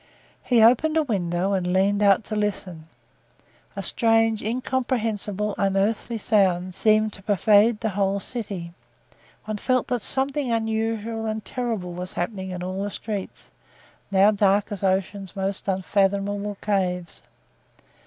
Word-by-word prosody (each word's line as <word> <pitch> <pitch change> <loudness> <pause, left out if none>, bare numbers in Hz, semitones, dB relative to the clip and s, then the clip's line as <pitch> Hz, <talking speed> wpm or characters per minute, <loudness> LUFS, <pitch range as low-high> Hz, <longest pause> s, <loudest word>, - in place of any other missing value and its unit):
He 235 -3 +3
opened 305 +8 +4
a 315 - +3
window 190 - -1
and 180 -2 0
leaned 200 +2 +2
out 200 +1 +4
to 215 - -5
listen. 185 -6 -3 0.9
A - - -4
strange, 225 -2 +2
incomprehensible, 225 -4 -1
unearthly 200 +4 0
sound 185 -4 +1
seemed 215 +2 +2
to - - -10
pervade 210 +2 +4
the 220 - 0
whole 200 0 0
city; 195 -6 -6 0.7
one 215 -1 -3
felt 255 +3 0
that 245 -2 0
something 270 +2 -1
unusual 225 0 -1
and 215 -1 -3
terrible 225 -8 -3
was 180 +1 -6
happening 190 +1 -3
in 180 -1 -5
all 185 +1 -3
the 205 - -2
streets, 205 -1 -6 0.6
now 200 +1 +5
dark 200 0 +2
as 205 - -5
ocean's 195 0 -1
most 195 +1 -3
unfathomable 200 +1 0
caves. 180 -4 -1
205 Hz, 135 wpm, -24 LUFS, 190-225 Hz, 0.9 s, now